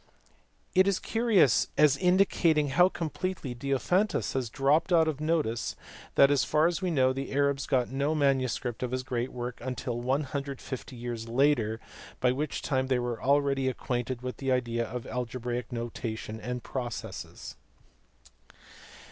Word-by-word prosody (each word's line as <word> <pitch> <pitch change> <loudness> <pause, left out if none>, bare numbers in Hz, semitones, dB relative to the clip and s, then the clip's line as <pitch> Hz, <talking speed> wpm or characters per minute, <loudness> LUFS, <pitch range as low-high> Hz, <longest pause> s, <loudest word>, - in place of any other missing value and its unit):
It 185 +1 +5
is 200 -2 +2
curious 225 - +3
as 150 -2 +6
indicating 180 -4 +3
how 175 +7 +5
completely 170 -4 -4
Diophantus 140 - 0
had 125 -4 -2
dropped 145 - +2
out 165 -2 +5
of 150 -2 -2
notice 155 -8 0 0.4
that 140 0 +6
as 145 - +3
far 155 +1 +2
as 175 +2 +1
we 185 - 0
know 130 -5 +3
the 135 +1 -5
Arabs 140 -1 +1
got 125 -3 +1
no 140 +3 0
manu 135 -3 +2
script 120 -1 -4
of 125 - -1
his 130 +1 -2
great 125 0 -2
work 120 0 -5 0.2
till 120 0 -3
150 135 0 -3
years 120 -1 -5
later, 120 -3 +2 0.4
by 125 - +3
which 145 +3 -3
time 130 -3 0
they 130 -1 +2
were 120 -2 -3
already 140 -1 +2
acquainted 125 -1 -3
with 125 0 -4
the 135 -1 -1
idea 120 -2 0
of 120 +1 -6
algebraic 125 0 -4
notation 115 -2 -5
and 125 0 -4
processes. 125 -3 -6
130 Hz, 150 wpm, -29 LUFS, 125-150 Hz, 0.4 s, as